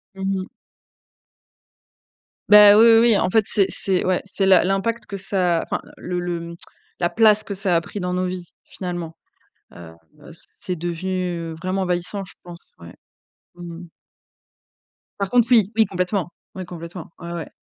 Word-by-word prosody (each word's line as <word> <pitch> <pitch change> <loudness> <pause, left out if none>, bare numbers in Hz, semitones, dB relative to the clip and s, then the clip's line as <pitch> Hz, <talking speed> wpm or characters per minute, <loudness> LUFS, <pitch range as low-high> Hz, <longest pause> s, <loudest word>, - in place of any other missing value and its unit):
Mmh. 195 0 -3 2.0
Ben 210 0 +9
oui, 225 - +7
oui, 225 - +7
oui. 230 -3 +5
En 185 - +1
fait, 215 +2 +2
c'est 200 -3 +2
c'est 185 -1 -1
ouais, 185 -1 +1
c'est 195 0 -2
la 190 -1 +6
l'impact 210 +5 -1
que 200 - -6
ça 185 -3 0
enfin, - - -4 0.2
le 180 0 -4
le 175 -1 -3
mmh, 170 0 -8 0.4
la 175 0 +1
place 215 -1 +4
que 200 - -6
ça 190 -2 0
a 165 - +3
pris 205 - -8
dans 180 0 -3
nos 185 0 -1
vies, 180 -1 -6
finalement, 175 -3 -6 0.6
heu 85 -2 -11 0.3
heu, - - -13 0.3
c'est 180 - -4
devenu 175 0 -3
vraiment 185 +1 -1
envahissant, 180 +2 -2
je 185 - -14
pense, 175 -1 -11 0.2
ouais. 85 0 -13 0.6
Mmh 175 -1 -9
mh. 175 - -12 1.3
Par 200 -1 -2
contre, 240 0 +3
oui, 215 -4 +5
oui, 220 - +5
complètement. 180 0 -2 0.3
Oui, 185 -1 -6
complètement. 170 0 -9
Ouais, 170 -1 -8
ouais. 170 -2 -6
185 Hz, 165 wpm, -21 LUFS, 175-200 Hz, 2.0 s, Ben